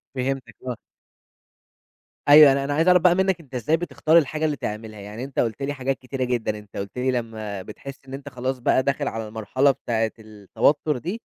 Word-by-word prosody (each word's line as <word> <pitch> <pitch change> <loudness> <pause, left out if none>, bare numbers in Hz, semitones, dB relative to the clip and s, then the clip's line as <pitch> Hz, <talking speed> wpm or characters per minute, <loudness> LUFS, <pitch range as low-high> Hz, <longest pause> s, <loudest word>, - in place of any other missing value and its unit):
فهمتك 130 -3 -3
آه. 125 - -2 1.5
أيوه، 145 -1 +10
أنا 135 0 +1
أنا 145 +1 -2
عايِز 160 +4 +1
أعرف 180 -1 +6
بقى 175 0 +5
مِنَّك، 190 -2 +1
أنتَ 135 -5 -12
إزاي 150 +7 +1
بتختار 165 -1 +2
الحاجة 155 0 +1
اللي 150 -2 0
تعملها؟ 110 -1 -6
يعني 105 +5 -7
أنتَ 135 0 -5
قُلت 115 +3 -1
لي 145 +1 -1
حاجات 135 0 -2
كتيرة 130 0 -4
جدًا، 120 -4 -1
أنتَ 105 -1 -13
قُلت 100 +4 -6
لي 130 +1 +1
لمَّا 110 -5 -4
بتحس 135 +7 -10
إن 135 - -10
أنتَ 140 +1 -7
خلاص 130 0 -3
بقى 130 +1 +2
داخل 140 +1 -1
على 110 -1 -4
المرحلة 120 +6 +1
بتاعة 115 -3 -1
التوتُّر 110 +8 0
دي، 185 - -5
130 Hz, 195 wpm, -23 LUFS, 110-145 Hz, 1.5 s, أيوه